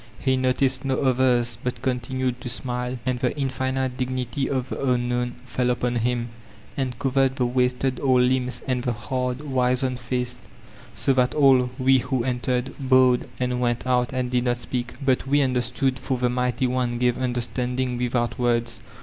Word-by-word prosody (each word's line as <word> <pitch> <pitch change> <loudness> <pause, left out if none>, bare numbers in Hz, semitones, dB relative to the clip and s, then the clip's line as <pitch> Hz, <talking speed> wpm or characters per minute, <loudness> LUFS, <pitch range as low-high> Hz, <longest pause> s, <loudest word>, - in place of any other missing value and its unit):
He 130 -1 +2
noticed 130 +1 +1
no 135 -1 0
others, 125 -3 +2
but 125 0 -4
continued 130 -1 -1
to 125 - -5
smile; 125 +1 -3
and 130 -2 0
the 125 +3 -1
infinite 130 -1 -1
dignity 130 0 -2
of 130 -1 -2
the - - -4
Unknown 120 0 -1
fell 125 0 -1
upon 120 0 0
him, 120 0 -1 0.5
and 130 -3 -2
covered 135 0 +1
the 130 -2 +1
wasted 125 +1 0
old 130 -2 +4
limbs 125 0 0
and 130 -2 0
the 125 - 0
hard* 125 +2 -3
wixened 130 -2 0
face, 125 0 -3 0.6
so 135 - +2
that 125 -1 +2
all 135 -4 +5
we 130 0 +4
who 125 0 -1
entered, 125 +1 -1
bowed, 130 -2 +4
and 125 -1 -1
went 120 0 0
out, 125 -1 +1
and 125 -1 -2
did 125 0 +1
not 120 0 +1
speak. 120 0 -4
But 130 0 +2
we 145 +2 +3
understood, 130 +1 0
for 130 - -2
the 125 0 +1
Mighty 125 +1 0
One 125 -1 0
gave 125 +1 +1
under 125 -1 0
standing 125 0 -2
without 120 0 -1
words. 120 -1 0
125 Hz, 175 wpm, -24 LUFS, 125-130 Hz, 0.6 s, all